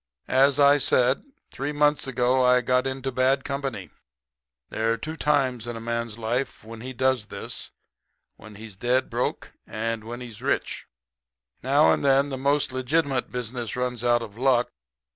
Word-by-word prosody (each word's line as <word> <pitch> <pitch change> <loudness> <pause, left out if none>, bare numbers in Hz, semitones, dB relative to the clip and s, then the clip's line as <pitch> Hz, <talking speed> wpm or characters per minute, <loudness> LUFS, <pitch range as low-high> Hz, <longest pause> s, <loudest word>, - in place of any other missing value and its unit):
"As 135 +1 +4
I 145 0 +6
said, 130 0 +3 0.3
three 140 +2 -3
months 150 -1 +2
ago 125 0 +2
I 125 0 +5
got 125 +1 +1
into 135 0 -3
bad 130 +2 +1
company. 140 -3 -4 0.8
There 110 +1 0
are 115 - 0
two 155 +5 -6
times 130 -7 0
in 120 - -4
a - - -6
man's 115 -1 -3
life 120 +4 -2
when 110 0 -10
he 130 +2 -6
does 130 -3 0
this - - -7 0.7
when 110 -1 -13
he's 110 -1 -10
dead 125 +5 0
broke, - - -2
and 115 0 -3
when 120 +2 -7
he's 120 -4 -9
rich. - - -2 0.7
"Now 80 - +4
and 80 - 0
then 140 +1 +3
the 135 - -4
most 140 0 +1
legitimate 130 0 0
business 120 -2 -5
runs 125 -2 -2
out 120 -1 +3
of 110 0 -10
luck. 125 -2 +3
125 Hz, 165 wpm, -25 LUFS, 115-135 Hz, 0.8 s, I